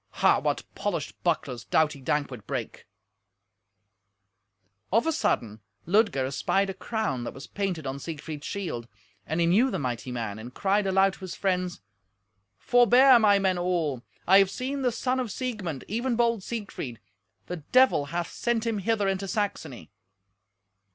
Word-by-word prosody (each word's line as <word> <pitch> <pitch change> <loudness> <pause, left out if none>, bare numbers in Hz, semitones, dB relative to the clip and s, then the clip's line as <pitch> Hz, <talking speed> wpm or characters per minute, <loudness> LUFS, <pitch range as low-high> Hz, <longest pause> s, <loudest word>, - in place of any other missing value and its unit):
Ha! - - +6
what - - -1
polished - - -3
bucklers 120 -3 -1
doughty 150 +7 +1
Dankwart 130 -6 -2
brake! - - -5 2.0
Of 225 +7 +3
a 325 - +2
sudden 110 - -1 0.3
Ludger 200 - +2
espied 195 +8 0
a - - -7
crown 190 - -2
that - - -6
was 135 - -9
painted 190 -6 -3
on 135 +1 -4
Siegfried's 155 -1 -6
shield, 160 - -4 0.4
and 160 +3 -1
he 170 - +3
knew 210 +10 +4
the - - -2
mighty 125 -2 -3
man, 115 -4 -4
and 120 +3 -10
cried 200 +1 +1
aloud 190 0 +3
to - - -13
his 185 -2 -6
friends, 185 -2 -1 0.8
"Forbear, 245 +1 +6
my 205 -2 +5
men 190 -2 +1
all. 170 -8 0 0.2
I 190 +2 +7
have 195 -1 +4
seen 270 +6 -3
the 250 -2 +2
son 255 +2 -1
of 250 -3 -2
Siegmund, 205 - -4
even 235 +4 -1
bold 235 -2 +2
Siegfried. 200 - -6 0.5
The 180 - -5
Devil 250 - +3
hath 170 +4 -3
sent 235 -1 -1
him 225 -3 0
hither 210 0 +1
into 195 0 -1
Saxony." 205 +1 -3
190 Hz, 155 wpm, -27 LUFS, 145-225 Hz, 2.0 s, I